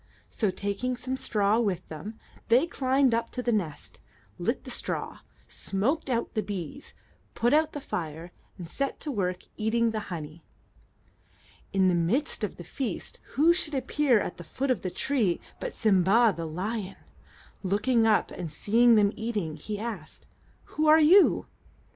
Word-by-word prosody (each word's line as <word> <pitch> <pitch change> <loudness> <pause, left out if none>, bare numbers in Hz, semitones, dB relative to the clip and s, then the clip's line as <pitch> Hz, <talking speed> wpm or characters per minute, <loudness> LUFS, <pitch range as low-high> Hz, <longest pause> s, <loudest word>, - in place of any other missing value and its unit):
So, 215 - 0
taking 205 +7 -2
some 255 +1 -3
straw 210 -3 +1
with 190 -6 -1
them, 200 +8 -8 0.3
they 245 +7 +5
climbed 265 -5 +2
up 230 0 0
to 250 - -3
the 240 - +1
nest, 175 -10 -3 0.4
lit - - -1
the - - -7
straw, - - -4 0.3
smoked 260 +11 -2
out 235 -2 -1
the 215 - 0
bees, 200 - -6 0.4
put 240 +3 +2
out 310 +1 +3
the 290 - -4
fire, 165 - -5 0.3
and 175 -3 -7
set 275 +10 -3
to 300 - -3
work 185 -6 -2
eating 230 +1 +1
the 220 - -2
honey. 160 -2 -7 1.3
In 190 -1 +3
the 180 - +3
midst 215 - 0
of 210 - -2
the 175 - -9
feast, 250 - -4
who 320 +5 +5
should 320 -4 -1
appear 265 -2 +2
at 180 - -4
the 175 - -8
foot 260 - -2
of 250 - 0
the 185 - -2
tree 220 -4 0 0.2
but - - -4
Sim'ba, 210 - +3
the 165 -1 -4
lion? 195 +4 -4 0.7
Looking 220 +4 +2
up, 215 -2 +2
and 165 -3 -6
seeing 230 +8 +4
them 205 -2 +4
eating, 210 -8 -3
he 205 +7 -5
asked, 210 -8 -6 0.4
"Who 310 0 -1
are 310 +1 +8
you?" 355 +6 +6
220 Hz, 165 wpm, -28 LUFS, 185-255 Hz, 1.3 s, are